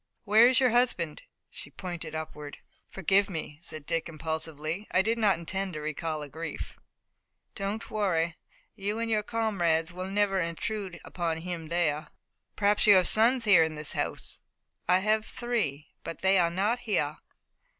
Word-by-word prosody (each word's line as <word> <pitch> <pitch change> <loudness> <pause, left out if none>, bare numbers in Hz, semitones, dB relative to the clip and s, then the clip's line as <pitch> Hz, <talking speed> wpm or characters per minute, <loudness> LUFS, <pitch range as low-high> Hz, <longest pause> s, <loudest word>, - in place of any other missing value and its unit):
"Where 220 +2 +6
is 255 +1 +4
your 255 -3 +4
husband?" 225 -10 +1 0.3
She - - -10
pointed 175 -3 -6
upward. 150 -2 -6 0.3
"Forgive 195 +2 +2
me," 160 -4 -5
said 155 -3 -9
Dick 165 +1 -1
impulsively. 160 +3 -4
"I 185 - +3
did 230 +2 0
not 210 -3 +4
intend 190 +3 -3
to 155 - -4
recall 155 0 -3
a - - -7
grief." 160 +4 -6 0.8
"Don't 200 +2 -4
worry. 170 -6 +1 0.4
You 205 +1 -2
and 230 0 -2
your 215 -1 +3
comrades 180 -7 0
will 185 +1 -5
never 195 -1 +2
intrude 180 +2 -3
upon 170 -2 -2
him 165 -1 -5
there." 155 -2 0 0.5
"Perhaps 205 0 +3
you 205 - +9
have 185 -1 +5
sons 235 +2 +3
here 195 -5 +7
in 160 -1 -2
this 150 -1 -4
house?" - - -4 0.5
"I 180 - +5
have 215 +2 +2
three, 215 - -3
but 165 - -7
they 190 0 +5
are 170 -1 +3
not 205 +8 0
here." 155 -10 -1
180 Hz, 160 wpm, -29 LUFS, 160-210 Hz, 0.8 s, you